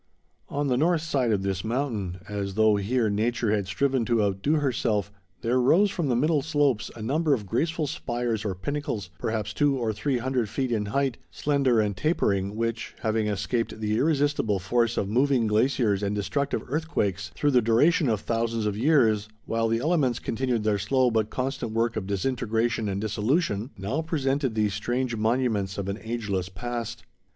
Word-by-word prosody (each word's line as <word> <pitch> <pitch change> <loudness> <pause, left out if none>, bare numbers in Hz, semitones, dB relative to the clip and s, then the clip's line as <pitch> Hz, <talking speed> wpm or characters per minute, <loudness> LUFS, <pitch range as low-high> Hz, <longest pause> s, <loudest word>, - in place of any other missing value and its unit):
On 145 +1 -1
the 125 -2 +2
north 160 +2 +2
side 135 -7 +1
of 100 -2 +1
this 95 -2 -2
mountain, 110 -7 -2
as 100 -2 -4
though, 110 -1 +4
here, 110 +4 +1
nature 110 +2 0
had 100 -3 0
striven 130 +6 +1
to 115 -2 +2
outdo 100 +8 0
herself, 115 -8 0 0.3
there 120 +3 +1
rose 185 +11 +4
from 170 -6 -2
the 120 - +2
middle 150 +4 +2
slopes 145 -6 +1
a 110 - -7
number 150 +5 +2
of 105 -5 -6
graceful 155 - 0
spires 120 -6 -2
or 100 -3 -2
pinnacles, 140 - -4
perhaps 110 +1 -2
200 145 -2 +2
or 115 -2 0
300 125 0 -1
feet 130 +3 -2
in 105 -3 0
height, 135 +2 0
slender 140 -5 +1
and 105 -2 +1
tapering, 100 - 0
which, 115 0 -3
having 110 -1 0
escaped 105 +3 -2
the 105 -1 0
irresistible 145 -6 +1
force 115 +5 0
of 100 - 0
moving 125 +2 +2
glaciers 110 -2 +2
and 100 0 -1
destructive 140 +7 -1
earthquakes, 105 - -1
through 145 -1 +2
the 125 -2 +5
duration 130 +7 +3
of 110 -3 0
thousands 115 -1 -1
of 105 -1 0
years, 110 -5 +3 0.2
while 115 0 0
the 115 0 +1
elements 140 -3 +1
continued 120 -2 -1
their 105 -2 +1
slow 125 +5 +2
but 110 -1 +1
constant 130 -3 -3
work 115 +1 +1
of 105 -3 -3
disintegration 115 +1 0
and 100 0 -2
dissolution, 110 - 0
now 105 +11 -2
presented 140 -6 -1
these 105 -2 +1
strange 120 +4 -1
monuments 110 -3 0
of 100 -1 -3
an 100 +2 -3
ageless 100 -5 -3
past. 120 +4 -5
115 Hz, 175 wpm, -26 LUFS, 105-135 Hz, 0.3 s, the